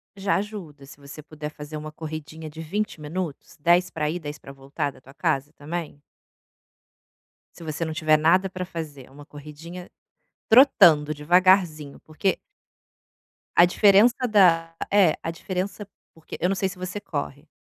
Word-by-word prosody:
Já 200 0 0
ajuda 190 -9 -6
se 140 - -14
você 140 +2 -11
puder 150 -1 -7
fazer 150 0 -10
uma 155 0 -6
corridinha 155 0 -8
de 155 +1 -9
20 190 0 -3
minutos, 160 0 -6
10 175 +3 +3
para 150 -3 -2
ir, 175 - -4
10 150 -1 -7
pra 135 - -12
voltar 140 +1 -4
da 130 - -19
tua 135 +2 -16
casa 150 -3 -1
também 155 0 -6 1.6
se 170 - -12
você 160 +1 -3
não 160 - -4
tiver 155 -2 +3
nada 180 +5 +3
pra 185 0 -5
fazer 155 -7 -8
uma 145 +2 -13
corridinha 155 +5 -11 0.6
trotando, 180 - +6
devagarzinho 165 -1 +2
porque 170 +5 -1 1.2
a 175 - +8
diferença 205 +5 +5
da 165 -6 +4 0.2
é 195 -6 +5
a 165 - -4
diferença 185 +3 -5 0.3
porque 160 -1 -10
eu 180 - +1
não 195 - 0
sei 190 0 -1
se 180 - -10
você 185 +2 -5
corre. 150 -5 -6
160 Hz, 155 wpm, -24 LUFS, 150-185 Hz, 1.6 s, a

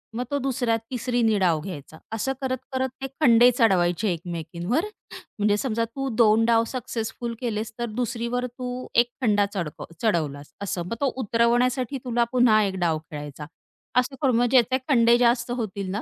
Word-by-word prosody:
मग 245 - -1
तो 285 - +1
दुसऱ्या, 250 -3 0 0.2
तिसरीने 240 -3 +1
डाव 170 -4 +2
घ्यायचा. 160 -3 -8 0.2
असं 245 +5 -1
करत, 260 -1 -1 0.2
करत 260 0 0
ते 270 - -2
खंडे 240 -3 +7
चढवायचे 190 -3 +2
एकमेकींवर. 175 - -3 0.5
म्हणजे 205 0 +3
समजा 230 -1 -1
तू 270 +4 -5
2 225 -1 +5
डाव 230 -1 +4
सक्सेसफुल 235 -1 -4
केलेस, 220 -2 -3
तर 240 - 0
दुसरीवर 240 +1 -2
तू 250 +1 -6
एक 240 0 +4
खंडा 205 -4 +3
चढकव 170 -7 -4 0.2
चढवलास, 150 -9 -1
असं. 180 -3 -3
मग 180 - -4
तो 275 -2 +2
उतरवण्यासाठी 245 +3 +1
तुला 240 -1 +2
पुन्हा 245 -4 +5
1 195 -2 -1
डाव 165 -3 +1
खेळायचा. 150 0 -7 0.5
असं 250 +2 +2
करून 260 -4 +3
मग 245 - +3
ज्याचे 255 0 +4
खंडे 235 -3 +5
जास्त 240 0 +2
होतील 200 -4 -4
ना, 205 +3 -2
230 Hz, 165 wpm, -25 LUFS, 200-250 Hz, 0.5 s, खंडे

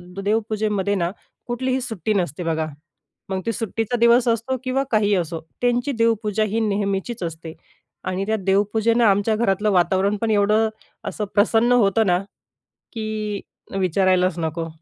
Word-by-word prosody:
The - - -6
देवपूजेमध्ये 210 -2 0
ना 175 -2 0 0.4
कुठलीही 255 +2 -1
सुट्टी 220 -5 -2
नसते 175 -4 -1
बघा. 160 -1 0 0.6
मग 190 -1 -2
ती 230 - +1
सुट्टीचा 225 +1 -2
दिवस 235 +1 +5
असतो 230 +3 0
किंवा 265 +1 0
काहीही 210 -2 +3
असो. 170 -2 -2 0.2
त्यांची 245 +2 +1
देवपूजा 225 -3 +1
ही 215 +1 -1
नेहमीचीच 200 +1 -1
असते 165 -1 -6 0.5
आणि 185 +1 -2
त्या 220 0 +1
देवपूजेनं 210 +4 +2
आमच्या 205 +1 +3
घरातलं 210 -1 +1
वातावरण 190 +3 +2
पण 225 -1 +1
एवढं 215 +1 +3 0.4
असं 210 - -4
प्रसन्न 225 +3 +3
होतं 220 -2 +3
ना, 175 -1 +3 0.7
की 215 -2 -3 0.4
विचारायलाच 185 -1 +2
नको. 165 0 -2
210 Hz, 140 wpm, -22 LUFS, 190-225 Hz, 0.7 s, दिवस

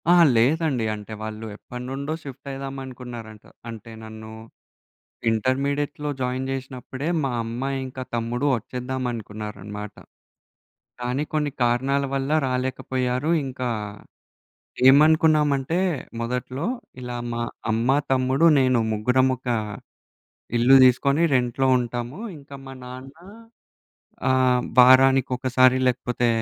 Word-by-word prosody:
ఆ! - - +7 0.2
లేదండి 135 +1 +2
అంటే 105 +1 -8
వాళ్ళు 110 0 -6
ఎప్పటినుండో 130 +6 -6
షిఫ్ట్ 140 -1 -10
అయిదాం 135 0 -6
అనుకున్నారంట. 120 -4 -9 0.3
అంటే 115 0 -9
నన్ను 110 0 -10 1.0
ఇంటర్మీడియట్‌లో 140 +5 -1
జాయిన్ 130 +1 -2
జేసినప్పుడే 130 +1 -5 0.2
మా 135 - 0
అమ్మా 120 +4 -3 0.2
ఇంకా 130 0 -7
తమ్ముడు 120 +4 -1
వచ్చేద్దాం 125 +3 -5
అనుకున్నారన్నమాట. 105 -1 -7 1.1
కానీ 125 +3 -1
కొన్ని 150 -1 0
కారణాల 130 +4 +1
వల్ల 135 +1 -2 0.2
రాలేకపోయారు. 130 +1 -1 0.2
ఇంకా 130 -1 -4 1.2
ఏమనుకున్నామంటే 155 +1 +4 0.4
మొదట్లో 125 +5 -3 0.4
ఇలా 125 -1 -5 0.2
మా 120 - -2 0.3
అమ్మ, 115 +3 0 0.2
తమ్ముడు, 130 +4 +2
నేను 130 -2 +3
ముగ్గురం 125 +5 +2
ఒక 125 - -13 1.1
ఇల్లు 125 +3 +6
దీసుకొని 140 +5 +4
రెంట్‌లో 125 +1 +1
ఉంటాము, 120 +5 -4 0.2
ఇంకా 140 -1 -12
మా 135 - -8
నాన్న 130 +2 -9 1.2
ఆహ్, 130 -1 +3 0.2
వారానికొకసారి 130 0 +5
లేకపోతే, 125 -1 0
130 Hz, 100 wpm, -24 LUFS, 120-135 Hz, 1.2 s, ఆ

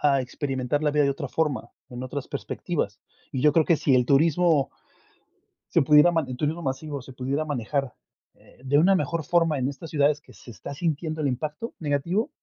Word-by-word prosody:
a - - +2
experimentar 130 +1 -2
la 150 - +2
vida 150 0 +2
de 140 - +2
otra 140 0 -5
forma, 140 -5 -1 0.2
en 125 0 -7
otras 130 +2 -5
perspectivas. - - -3 0.3
Y 130 - -2
yo 150 -1 +5
creo 160 -1 +4
que 165 - +3
sí 140 - +2
el 125 -1 +3
turismo 155 +1 +3 1.0
se - - +5
pudiera, 150 +4 +6 0.2
el 130 - -5
turismo 155 +4 -1
masivo, 140 +1 -4
se 130 +1 -12
pudiera 135 +5 -2
manejar, 135 -1 -2 0.4
eh, - - -22
de 135 +2 +2
una 180 +6 +5
mejor 170 -4 0
forma 165 -1 +2
en 130 0 0
estas 140 +3 -8
ciudades 145 -1 +2
que - - -18
se 120 - -13
está 110 +6 -8
sintiendo 155 0 -2
el 145 - +1
impacto 150 - -4
negativo, 170 - 0
145 Hz, 195 wpm, -25 LUFS, 135-160 Hz, 1.0 s, pudiera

